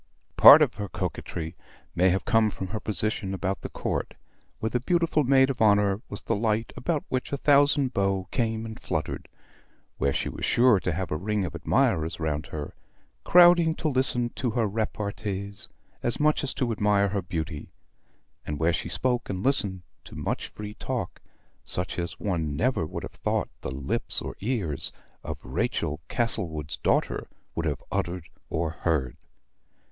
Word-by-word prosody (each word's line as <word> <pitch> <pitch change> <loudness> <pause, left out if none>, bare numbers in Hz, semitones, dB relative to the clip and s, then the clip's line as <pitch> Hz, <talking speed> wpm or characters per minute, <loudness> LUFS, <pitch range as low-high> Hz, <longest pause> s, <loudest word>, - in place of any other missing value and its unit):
Part - - +11
of - - 0
her 100 - -4
coquetry 80 -2 -4 0.4
may 90 +2 +4
have 95 +2 0
come 115 -2 +4
from 95 -2 -6
her 110 - -3
position 105 -2 -1
about 95 +1 -2
the - - -5
Court, - - -3 0.4
where 110 - -1
the 125 - +1
beautiful 165 +2 +2
maid 130 0 +5
of 125 - -6
honor 100 -1 +4
was 100 - -4
the 115 - 0
light 110 +1 0
about 145 +4 -1
which 130 -1 -2
a 140 - 0
thousand 140 -2 +4
beaux 95 -1 0
came 115 -1 -1
and 110 -1 -7
fluttered; - - -3 0.7
where 70 - +2
she - - -1
was - - -6
sure 120 -4 +5
to 90 - -1
have 90 +3 -3
a 75 - 0
ring 105 +2 -1
of 85 - -5
admirers 80 +1 +1
round 75 -2 -2
her, 75 -2 -6 0.5
crowding 175 -2 +6
to 160 - -2
listen 130 -3 +1
to 125 - -2
her 115 0 +1
repartees 100 -1 -3 0.3
as 120 - -1
much 150 +1 +3
as 140 - -2
to 125 -3 0
admire 105 -2 +2
her 100 +1 -1
beauty; 80 -3 -5 0.7
and 75 - -4
where 80 +3 +2
she - - -2
spoke 125 -2 0
and 95 -1 -3
listened 100 -10 +1 0.2
to - - -12
much - - -2
free 105 0 -8
talk, - - -4 0.4
such 90 0 -3
as 85 0 -4
one 80 -7 -1
never 120 - +1
would - - -6
have - - -6
thought - - -1
the - - -4
lips 65 +1 -2
or - - -6
ears 100 - -2 0.3
of - - -4
Rachel 75 0 -1
Castlewood's 80 - -2
daughter - - 0 0.3
would 85 -1 -2
have 75 -4 -2
uttered 85 -1 -2 0.2
or 80 0 -1
heard. 80 -6 -1
100 Hz, 170 wpm, -27 LUFS, 85-120 Hz, 0.7 s, Part